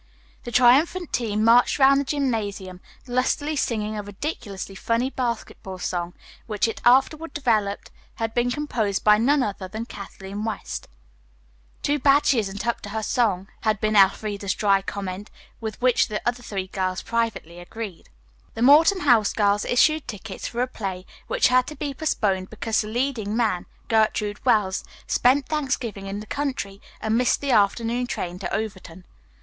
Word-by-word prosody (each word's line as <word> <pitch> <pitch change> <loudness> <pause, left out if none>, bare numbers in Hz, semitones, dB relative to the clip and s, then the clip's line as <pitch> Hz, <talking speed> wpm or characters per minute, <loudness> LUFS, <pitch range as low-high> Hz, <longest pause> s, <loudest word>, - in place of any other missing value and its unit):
The 240 - -5
triumphant 280 +9 +4
team 215 -3 0
marched 235 +5 +5
around 275 0 +6
the - - 0
gymnasium, 210 -10 -2 0.2
lustily 260 +4 0
singing 215 -6 -1
a 210 - -3
ridiculously 205 -2 -6
funny 230 +6 -1
basketball 235 -7 -4
song 175 -1 -3 0.3
which 215 -1 +1
it 225 - -5
afterward 270 +6 +3
developed 215 -8 0 0.2
had 225 0 -3
been 240 0 +1
composed 240 -8 -1
by 210 0 +6
none 275 +4 +3
other 195 -3 -4
than 220 +5 -5
Kathleen 200 -1 -8
West. 220 -1 -5 1.0
"Too 290 +1 +1
bad 280 +2 +4
she 255 - +4
isn't 200 0 -4
up 235 - -1
to 205 - -8
her 220 +1 -3
song," 210 -7 +1
had 215 -2 0
been 215 0 0
Elfreda's 200 0 +2
dry 200 -2 +3
comment, 195 0 -5 0.3
with 220 -3 -5
which 255 -1 +4
the 210 -1 -3
other 245 0 -1
three 200 -5 -4
girls 185 -1 -2
privately 225 -7 -2
agreed. 190 0 -8 0.5
The 225 - -1
Morton 320 +8 +6
House 240 -8 +4
girls 205 -1 +2
issued 310 +5 +3
tickets 210 -1 -6
for 240 +1 -1
a - - -1
play, 190 -6 -5 0.2
which - - +3
had 255 0 +3
to 305 - -7
be 290 -2 -4
postponed 200 -11 -1
because 220 0 -1
the 210 - -6
leading 230 -2 -2
man 215 -7 0 0.2
(Gertrude 215 -2 +1
Wells) 190 -3 +2 0.2
spent 265 +2 +3
Thanksgiving 255 -10 -2
in 200 +1 -4
the - - -9
country 235 -8 -4 0.2
and 220 0 0
missed 250 - +2
the 280 -1 -1
afternoon 230 +3 +2
train 180 -5 -4
to - - -4
Overton. 185 -5 -5
220 Hz, 165 wpm, -24 LUFS, 200-250 Hz, 1.0 s, around